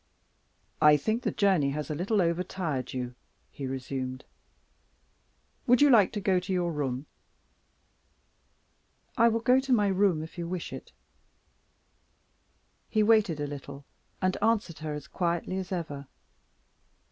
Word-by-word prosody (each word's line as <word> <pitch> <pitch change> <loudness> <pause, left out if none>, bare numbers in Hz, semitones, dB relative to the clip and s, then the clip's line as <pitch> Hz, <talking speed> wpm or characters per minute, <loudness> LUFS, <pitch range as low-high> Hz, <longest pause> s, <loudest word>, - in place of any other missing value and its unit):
"I 150 0 +7
think 220 - -1
the - - -1
journey 190 -9 +2
has 150 +1 -4
a - - 0
little 190 +5 +1
over 170 +1 0
tired 155 -9 -3
you," 125 -1 -4 0.4
he 135 - -6
resumed. 130 0 -5 1.4
"Would 245 0 +5
you 290 -1 +6
like 210 -6 +6
to 210 - -2
go 190 -2 +2
to 185 +2 -6
your 175 -2 0
room?" 135 -3 -3 2.1
"I 230 -1 +5
will 230 0 -1
go 250 +3 +4
to 265 0 -4
my 210 -5 +4
room, 190 -5 +2
if 160 +3 -10
you 170 - -3
wish 180 -1 -5
it." - - -9 2.0
He 215 -1 +2
waited 210 -7 +3
a 145 - -1
little, 140 -1 -8 0.4
and 185 0 +2
answered 215 -8 +1
her 155 -1 -4
as 150 - -8
quietly 175 +1 -2
as 190 0 -6
ever. 150 -6 -4
175 Hz, 145 wpm, -28 LUFS, 145-205 Hz, 2.1 s, I